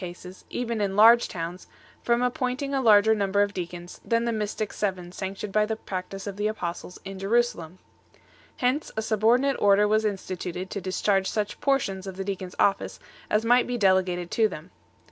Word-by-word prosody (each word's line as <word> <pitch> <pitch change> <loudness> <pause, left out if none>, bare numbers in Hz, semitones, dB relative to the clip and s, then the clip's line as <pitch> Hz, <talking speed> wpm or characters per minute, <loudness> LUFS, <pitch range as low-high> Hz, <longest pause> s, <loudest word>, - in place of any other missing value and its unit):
131 175 -1 -6 0.2
cases, 185 - -18
even 235 -3 -3
in 195 -1 -1
large 230 +3 +7
towns, 175 +1 -6 0.3
from 235 +1 +1
appointing 255 +3 -1
a 270 - +1
larger 220 -2 +6
num 200 -3 -1
ber 200 +1 +4
of 205 0 -3
deacons 175 -1 -7
than 230 0 +1
the 235 - 0
mystic 215 -1 -3
seven 185 -4 -3
sanctioned 195 +2 -6
by 215 - +4
the 220 +1 -2
practice 195 -2 -6
of 200 -1 -6
the 205 +1 0
Apostles 180 -4 -5
in 195 0 -7
Jerusalem 195 -5 0 0.4
1. - - -28 0.4
Hence 255 +5 0
a - - +1
subordi 220 +3 +3
nate 275 -1 0
order 205 0 +5
was 215 +1 +2
instituted 185 -3 -4
to 200 - -4
discharge 190 +1 0
such 210 -1 -3
portions 200 -9 0
of 190 -1 -7
the 195 - -3
Deacons 190 -2 -5
office 200 - +1 0.3
as 215 +2 +1
might 245 +2 +4
be 245 0 -2
delegated 185 -4 +1
to 225 -1 +3
them. 170 -2 -10
205 Hz, 195 wpm, -26 LUFS, 190-225 Hz, 0.4 s, large